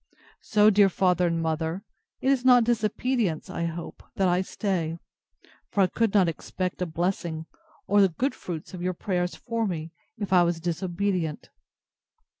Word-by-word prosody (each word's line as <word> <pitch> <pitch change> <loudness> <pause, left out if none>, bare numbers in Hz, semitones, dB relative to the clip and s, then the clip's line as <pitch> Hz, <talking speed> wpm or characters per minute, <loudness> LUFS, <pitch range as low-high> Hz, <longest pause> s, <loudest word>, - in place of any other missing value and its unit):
So, 210 0 +4
dear 200 -1 +5
father 180 -1 +2
and 170 -1 0
mother, 160 +3 -2 0.4
it 265 - +3
is 265 -3 +1
not 250 -2 +7
disobedience, 225 -4 0
I 170 - -2
hope, 170 0 -6
that 195 - +2
I 180 +1 +2
stay; 180 -4 -2 0.7
for 200 - +1
I - - +6
could 225 +3 0
not 190 -3 +5
expect 180 +3 -4
a 180 - 0
blessing, 165 -1 -2 0.4
or 205 +1 +4
the 195 - +5
good 255 - -1
fruits 165 -1 -7
of 180 - -6
your 180 0 -1
prayers 180 -1 -1
for 230 -2 -2
me, 165 -3 -4 0.3
if 205 -2 -3
I 180 - +7
was 170 -1 +1
disobedient. 175 -1 -2
180 Hz, 165 wpm, -26 LUFS, 170-205 Hz, 0.7 s, not